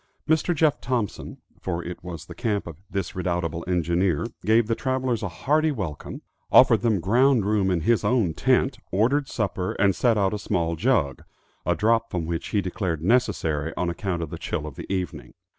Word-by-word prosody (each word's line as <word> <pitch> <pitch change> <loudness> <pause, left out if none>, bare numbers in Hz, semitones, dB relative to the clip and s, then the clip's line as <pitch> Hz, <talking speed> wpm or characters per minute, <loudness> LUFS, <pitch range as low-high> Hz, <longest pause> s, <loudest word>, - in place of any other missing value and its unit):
Mr. 160 +2 +2
Jeff 150 -1 +2
Thompson, 120 -5 -3 0.2
for 85 -2 -3
it 90 +1 -7
was 85 -3 -7
the - - -9
camp 110 -5 -1
of 85 0 -10
this 95 -3 -3
redoubtable 85 -2 -2
engineer, 90 0 +1 0.2
gave 110 +1 +4
the 115 - 0
travelers 130 -2 -1
a 100 - -2
hearty 150 - +1
welcome, 95 - -5 0.3
offered 120 -4 +7
them 115 -4 +2
ground 120 +4 +3
room 100 -2 +2
in 90 -3 +1
his 115 +7 +2
own 110 -10 +2
tent, - - +1
ordered 130 +9 +2
supper, 95 -6 -2
and 100 -2 +2
set 120 -3 +2
out 100 -1 +2
a 105 - -2
small 85 -5 -1
jug, 80 - +1 0.4
a - - +3
drop 115 +2 +2
from 85 -4 -2
which 85 0 -3
he 105 - +1
declared 90 -4 -3
necessary 80 -9 +1
on 90 -1 0
account 85 -1 -3
of 80 - -7
the - - -6
chill 75 - -3
of 75 - -7
the - - -8
evening. 95 -2 -4
100 Hz, 190 wpm, -25 LUFS, 85-115 Hz, 0.4 s, offered